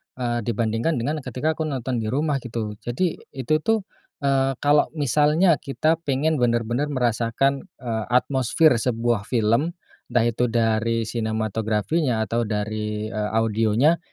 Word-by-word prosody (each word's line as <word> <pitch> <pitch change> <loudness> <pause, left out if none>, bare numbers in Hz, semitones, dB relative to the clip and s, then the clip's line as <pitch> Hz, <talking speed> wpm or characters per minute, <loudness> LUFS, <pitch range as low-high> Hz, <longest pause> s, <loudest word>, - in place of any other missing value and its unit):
eee, 120 -2 -1
dibandingkan 115 +6 0
dengan, 145 +6 -1
eee, 135 - -14
ketika 130 +6 -1
aku 155 - 0
nonton 130 -3 -2
di 110 - -3
rumah 140 +3 0
gitu. 115 -4 -4
Jadi 160 +9 -2 0.2
itu 135 +4 +1
tuh, 220 +4 +1 0.4
eee, 135 -1 +2
kalau 145 +1 +4
misalnya 150 +4 +3
kita 155 +4 0
pengen 145 +3 +1
bener-bener 120 +3 +1
merasakan, 125 +1 0 0.2
eee, 110 -3 -2
atmosfer 130 +5 +3
sebuah 115 -3 0
film 120 - +1 0.3
entah 120 -1 +2
itu 120 +1 +1
dari 115 0 +1
sinematografinya, 110 - -1
atau 115 +1 -1
dari, 105 0 -3
eee, 105 -1 -2
audionya. 115 +8 +2
120 Hz, 135 wpm, -23 LUFS, 110-140 Hz, 0.4 s, kalau